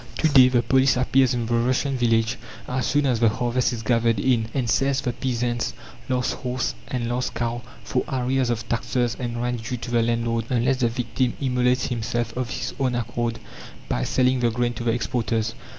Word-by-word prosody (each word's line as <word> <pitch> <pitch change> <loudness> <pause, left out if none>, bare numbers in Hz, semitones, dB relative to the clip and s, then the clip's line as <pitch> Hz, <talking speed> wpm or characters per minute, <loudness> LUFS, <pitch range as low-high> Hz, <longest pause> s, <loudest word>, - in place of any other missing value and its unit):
To 160 - +3
day 135 -4 +7
the 120 -2 +2
police 130 +1 +3
appears 130 0 +3
in 120 -1 -1
the 120 - -2
Russian 130 +3 +1
village 115 -1 +1 0.3
as 125 -1 -1
soon 145 +3 +2
as 125 -4 +1
the 115 -1 +5
harvest 120 +3 0
is 115 -2 -5
gathered 115 -2 +2
in, 115 -1 +2
and 125 -2 -1
sells 135 +4 +2
the 125 -3 -2
peasant's 120 -1 -2 0.3
last 125 -1 0
horse 125 +1 -2
and 120 -2 -2
last 125 +1 -2
cow 120 0 -2 0.2
for 125 - -1
arrears 130 -1 0
of 115 -1 -2
taxes 120 0 0
and 120 -2 -3
rent 120 -1 -2
due 125 +2 -3
to 120 +1 -7
the 120 -1 +3
landlord, 115 0 0
unless 125 +1 +2
the 120 -2 +2
victim 120 +1 -1
immolates 125 -1 +1
himself 120 -1 -2
of 125 -1 -2
his - - -4
own 130 -2 +1
accord 120 0 -2 0.5
by - - 0
selling 130 - +2
the 120 -1 +2
grain 120 +1 0
to 120 - -6
the 115 - +2
exporters. 115 -1 -1
120 Hz, 200 wpm, -24 LUFS, 115-130 Hz, 0.5 s, day